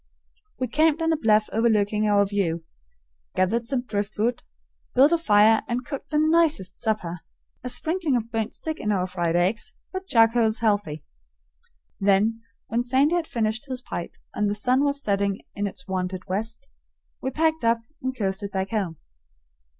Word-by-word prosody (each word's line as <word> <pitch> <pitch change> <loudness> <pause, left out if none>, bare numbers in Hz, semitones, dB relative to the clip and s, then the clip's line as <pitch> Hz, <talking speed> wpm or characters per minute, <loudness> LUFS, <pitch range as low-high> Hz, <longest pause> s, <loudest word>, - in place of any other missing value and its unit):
We 255 - -1
camped 310 +5 +2
on 325 0 +2
a - - +2
bluff 215 -7 +3
overlooking 215 -2 +2
our 205 -1 +4
view, 185 -5 -1 0.7
gathered 225 +5 +1
some 260 -2 0
driftwood, 215 +1 -1 0.5
built 275 +5 +6
a 340 - +4
fire, 215 -5 +5
and 245 +1 -2
cooked 280 0 -6
the 300 - 0
NICEST 310 - +3
supper 180 -6 -2 0.4
a 250 - -3
sprinkling 320 +1 0
of 230 -1 -2
burnt 225 -1 -2
stick 315 0 -4
in 210 - -1
our 185 -3 +1
fried 175 -2 -1
eggs, 185 +6 0 0.2
but 375 0 -5
charcoal's 225 -2 +4
healthy. 205 -9 0 1.0
Then, 205 +3 +2 0.2
when 235 +1 0
Sandy 265 +6 +2
had 345 -2 0
finished 225 +3 -1
his 255 -1 -4
pipe 175 -8 -6 0.2
and 210 0 0
"the 205 - -1
sun 255 +6 +2
was 285 -1 +1
setting 200 -1 0
in 205 0 -2
its 270 +6 -9
wonted 185 -1 -3
west," 225 +7 -4 0.5
we 265 - -1
packed 320 +2 +1
up 230 0 +3 0.2
and 260 0 -3
coasted 200 -1 -2
back 190 0 -3
home. 190 -7 -2
225 Hz, 165 wpm, -25 LUFS, 200-260 Hz, 1.0 s, built